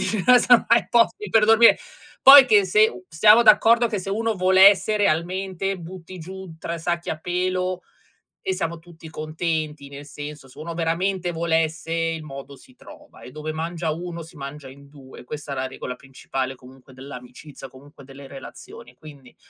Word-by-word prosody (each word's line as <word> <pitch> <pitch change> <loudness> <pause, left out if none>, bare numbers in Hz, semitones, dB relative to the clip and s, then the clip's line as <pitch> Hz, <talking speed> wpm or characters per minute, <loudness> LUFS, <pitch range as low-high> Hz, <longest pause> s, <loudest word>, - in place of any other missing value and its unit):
se 210 -3 -2 0.3
non 245 -2 +6
hai 235 -2 +3
posti 240 - +1
per 225 -1 +4
dormire. 225 +2 +6 0.5
Poi 270 0 +10
che 210 -5 +4
se 215 +4 +3
u 185 - -13
siamo 210 +8 +5
d'accordo 225 +2 +5
che 215 -2 -3
se 190 - -8
uno 225 +2 -1
volesse 190 +2 +4
realmente, 190 +1 -2
butti 180 +1 -11
giù 185 0 -10
3 165 +1 -6
sacchi 170 +1 -3
a 155 - -5
pelo 185 +1 -3 0.6
e 385 -4 -2
siamo 165 - -4
tutti 165 -1 -15
contenti, 155 -2 -4
nel 140 +1 -11
senso 145 -1 -10
se 130 - -20
uno 170 +2 -7
veramente 175 +2 -2
volesse 165 0 -2
il 165 -1 -2
modo 140 -1 -10
si 130 - -20
trova, - - -17
e 125 - -12
dove 155 +2 -6
mangia 165 +1 -4
1 170 +1 -7
si 165 0 -16
mangia 140 0 -9
in 140 +1 -16
2, 135 -3 -15
questa 145 +2 -8
è - - -4
la 130 0 -3
regola 130 -1 -8
principale 135 0 -6
comunque 130 +1 -18
dell'amicizia, 130 +1 -12
comunque 140 +2 -17
delle 135 +1 -13
relazioni, 135 -2 -13
quindi 140 -3 -16
165 Hz, 170 wpm, -22 LUFS, 140-190 Hz, 0.6 s, Poi